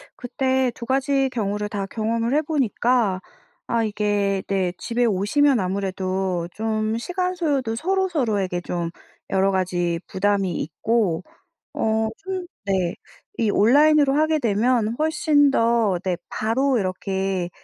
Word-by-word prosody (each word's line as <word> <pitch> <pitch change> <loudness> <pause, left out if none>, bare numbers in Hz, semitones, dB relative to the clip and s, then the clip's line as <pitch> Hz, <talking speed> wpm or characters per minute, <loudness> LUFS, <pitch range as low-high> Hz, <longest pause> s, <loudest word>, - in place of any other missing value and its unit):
그때 260 +1 0
2 235 - -9
가지 270 0 +1
경우를 210 -3 -2
다 200 -2 -3
경험을 230 +3 -1
해 300 - +3
보니까 245 - +1 0.5
아 230 -1 +1
이게 205 -2 0
네 185 -2 0
집에 240 +1 0
오시면 235 +6 +2
아무래도 185 -2 -2
좀 220 0 -1
시간 360 +8 -2
소요도 280 -9 0
서로 380 +8 0
서로에게 205 - -1
좀 175 -1 -3 0.4
여러 195 +1 +2
가지 175 -2 0
부담이 195 -2 0
있고 185 +1 0 0.5
어 220 0 +1
좀 375 -2 -5 0.2
네 185 -3 0 0.4
이 215 -3 +2
온라인으로 285 +5 +5
하게 310 +1 +2
되면 230 0 +1
훨씬 305 -2 +3
더 230 -6 +2
네 185 -2 -1
바로 255 +5 +1
이렇게 190 -1 -2
220 Hz, 245 characters per minute, -23 LUFS, 195-265 Hz, 0.5 s, 온라인으로